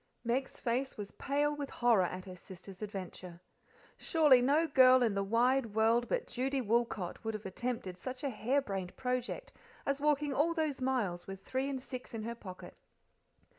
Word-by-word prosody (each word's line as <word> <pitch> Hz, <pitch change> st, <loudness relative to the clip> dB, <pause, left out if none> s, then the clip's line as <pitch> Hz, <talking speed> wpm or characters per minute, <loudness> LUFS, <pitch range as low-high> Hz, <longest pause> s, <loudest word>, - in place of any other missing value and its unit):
Meg's 250 Hz, +3 st, -1 dB
face 255 Hz, +2 st, -1 dB
was 205 Hz, -1 st, -6 dB
pale 290 Hz, +1 st, 0 dB
with 285 Hz, -1 st, -4 dB
horror 240 Hz, -5 st, +3 dB
at 185 Hz, +1 st, -5 dB
her 185 Hz, -1 st, -8 dB
sister's 185 Hz, +1 st, -11 dB
adventure. 185 Hz, -4 st, -6 dB, 0.6 s
Surely 300 Hz, -6 st, +5 dB
no 290 Hz, +6 st, +3 dB
girl 260 Hz, -4 st, +6 dB
in 225 Hz, -3 st, +2 dB
the 200 Hz, -, 0 dB
wide 230 Hz, +2 st, +2 dB
world 230 Hz, +2 st, +3 dB
but -, -, 0 dB
Judy 265 Hz, +2 st, -1 dB
Woolcot 230 Hz, -6 st, -1 dB
would 225 Hz, -1 st, -2 dB
have 215 Hz, -, -7 dB
attempted 190 Hz, -2 st, -4 dB
such 255 Hz, +6 st, -6 dB
a 280 Hz, -, 0 dB
harebrained 215 Hz, -6 st, -1 dB
project 255 Hz, -, -2 dB, 0.3 s
as 280 Hz, 0 st, 0 dB
walking 295 Hz, -1 st, +2 dB
all 325 Hz, +5 st, +2 dB
those 310 Hz, -5 st, -1 dB
miles 220 Hz, -10 st, -1 dB
with 195 Hz, 0 st, -8 dB
three 265 Hz, +2 st, -1 dB
and 265 Hz, -2 st, -4 dB
six 250 Hz, -3 st, -7 dB
in 220 Hz, -, -4 dB
her 230 Hz, +1 st, -3 dB
pocket. 185 Hz, -6 st, -10 dB
245 Hz, 170 wpm, -33 LUFS, 205-275 Hz, 0.6 s, girl